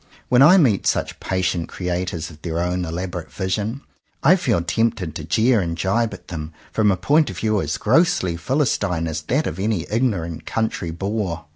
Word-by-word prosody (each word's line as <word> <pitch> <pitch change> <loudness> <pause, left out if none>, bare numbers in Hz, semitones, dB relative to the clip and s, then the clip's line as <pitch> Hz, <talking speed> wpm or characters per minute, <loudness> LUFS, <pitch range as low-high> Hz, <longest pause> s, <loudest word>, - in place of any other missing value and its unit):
When 125 0 +5
I 175 +7 +8
meet 125 - +3
such - - 0
patient 90 -3 -1
creators 90 -3 -3
of 75 -1 -15
their 80 -1 -3
own 90 +1 -1
elaborate 85 +1 -5
vision, 105 +6 -2 0.4
I 165 +7 +7
feel 125 - +1
tempted 90 -2 0
to 85 - -6
jeer 115 +1 +3
and 85 -2 -3
jibe 110 +6 +1
at - - -16
them 80 -2 -6 0.2
from 110 -1 +2
a 95 - +2
point 150 - +3
of 95 - -7
view 110 0 +1
as 75 +2 -2
grossly 130 - +2
philistine 90 - 0
as 80 -1 -3
that 135 - 0
of 80 - -4
any 100 -4 0
ignorant 95 -9 -1
country 110 -6 -2
boor. 90 -1 -3
95 Hz, 180 wpm, -21 LUFS, 85-115 Hz, 0.4 s, I